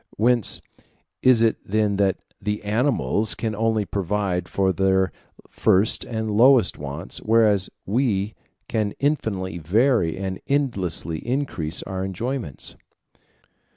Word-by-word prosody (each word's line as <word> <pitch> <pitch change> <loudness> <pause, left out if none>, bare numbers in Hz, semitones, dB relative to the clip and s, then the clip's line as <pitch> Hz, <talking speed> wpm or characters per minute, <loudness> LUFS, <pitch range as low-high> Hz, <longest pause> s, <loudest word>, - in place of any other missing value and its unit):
Whence 120 -1 +2 0.6
is 125 -3 +5
it 115 - +3
then 105 -1 0
that 100 -2 +2 0.2
the 105 +1 -2
animals 110 0 +1
can 110 -2 -2
only 110 -1 +1
provide 95 -2 -2
for 95 -1 +1
their 95 0 +2 0.4
first 100 +4 +2
and 110 -2 -3
lowest 120 +3 +5
wants, 75 +5 -5
whereas 110 -3 +3 0.2
we 105 -2 0 0.3
can 105 -2 -1
infinitely 100 - -1
vary 100 - +2
and 95 -1 -4
endlessly 95 - 0
increase 120 - -2
our 95 -1 -4
enjoyments? 105 - -4
105 Hz, 115 wpm, -23 LUFS, 95-115 Hz, 0.6 s, is